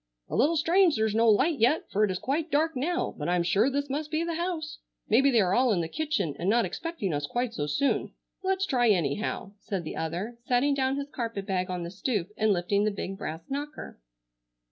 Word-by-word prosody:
"A -, -, -3 dB
little 320 Hz, +5 st, +3 dB
strange 340 Hz, +2 st, +4 dB
there's 220 Hz, -1 st, +1 dB
no 225 Hz, +1 st, +4 dB
light 275 Hz, +8 st, +3 dB
yet, 250 Hz, +8 st, +3 dB
for 210 Hz, -, +2 dB
it 210 Hz, -, +3 dB
is 185 Hz, -, -1 dB
quite 295 Hz, -, -2 dB
dark 315 Hz, +1 st, +1 dB
now, 340 Hz, +8 st, -1 dB
but 150 Hz, -, -2 dB
I'm 175 Hz, -1 st, +2 dB
sure 200 Hz, +8 st, +3 dB
this 285 Hz, +1 st, -1 dB
must 295 Hz, +2 st, -3 dB
be 315 Hz, +1 st, 0 dB
the 335 Hz, 0 st, -2 dB
house. 325 Hz, -2 st, -3 dB, 0.3 s
Maybe 265 Hz, +6 st, +5 dB
they 235 Hz, -5 st, +4 dB
are 185 Hz, -1 st, +1 dB
all 250 Hz, +1 st, +3 dB
in 180 Hz, -5 st, +2 dB
the 165 Hz, -, -2 dB
kitchen 200 Hz, -, -1 dB
and 180 Hz, -, 0 dB
not 235 Hz, +1 st, +3 dB
expecting 275 Hz, -, -3 dB
us 145 Hz, 0 st, -2 dB
quite 240 Hz, +3 st, -2 dB
so 145 Hz, -6 st, -2 dB
soon. 275 Hz, -, 0 dB, 0.3 s
Let's 385 Hz, 0 st, 0 dB
try 245 Hz, -8 st, +2 dB
anyhow," 195 Hz, +3 st, 0 dB
said 195 Hz, -4 st, -4 dB
the 155 Hz, -, -6 dB
other, 185 Hz, +9 st, -4 dB
setting 255 Hz, +3 st, +3 dB
down 265 Hz, -1 st, +1 dB
his 280 Hz, 0 st, -5 dB
carpet 230 Hz, -5 st, -4 dB
bag 185 Hz, -2 st, -1 dB
on 180 Hz, -1 st, -3 dB
the 170 Hz, -, -6 dB
stoop 200 Hz, -2 st, -2 dB
and 215 Hz, 0 st, +2 dB
lifting 200 Hz, +2 st, +1 dB
the 215 Hz, -, +2 dB
big 195 Hz, -1 st, -5 dB
brass 160 Hz, -3 st, -5 dB
knocker. 290 Hz, -, -6 dB
235 Hz, 225 wpm, -28 LUFS, 190-290 Hz, 0.3 s, Maybe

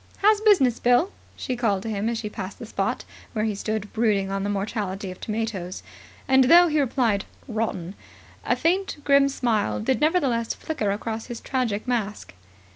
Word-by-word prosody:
"How's 420 Hz, +1 st, +4 dB
business, 320 Hz, -, +4 dB
Bill?" 245 Hz, +11 st, +3 dB, 0.2 s
she 255 Hz, -, -3 dB
called 210 Hz, -6 st, 0 dB
to 225 Hz, -, -4 dB
him 210 Hz, +2 st, -1 dB
as 235 Hz, -, -2 dB
she 215 Hz, -, -4 dB
passed 195 Hz, -2 st, -6 dB
the -, -, -8 dB
spot 220 Hz, -, -2 dB, 0.3 s
where 215 Hz, -2 st, 0 dB
he 215 Hz, -, 0 dB
stood 210 Hz, 0 st, -4 dB
brooding 205 Hz, -4 st, +1 dB
on 195 Hz, 0 st, -1 dB
the 200 Hz, -, -1 dB
mortality 200 Hz, -1 st, -3 dB
of 185 Hz, -, -12 dB
tomatoes. 210 Hz, -5 st, -4 dB, 0.4 s
And, 265 Hz, -1 st, +5 dB
though 345 Hz, +5 st, +7 dB
he 305 Hz, 0 st, +1 dB
replied 235 Hz, -7 st, +1 dB, 0.2 s
"Rotten", 215 Hz, -6 st, -3 dB, 0.5 s
a -, -, +1 dB
faint, 370 Hz, +3 st, 0 dB
grim 280 Hz, -1 st, +5 dB
smile 235 Hz, -6 st, 0 dB
did 260 Hz, +5 st, 0 dB
nevertheless 275 Hz, -8 st, +1 dB
flicker 260 Hz, -10 st, -2 dB
across 220 Hz, +2 st, -3 dB
his 240 Hz, -2 st, -6 dB
tragic 245 Hz, -5 st, -2 dB
mask. 215 Hz, -, -2 dB
225 Hz, 175 wpm, -24 LUFS, 205-265 Hz, 0.5 s, though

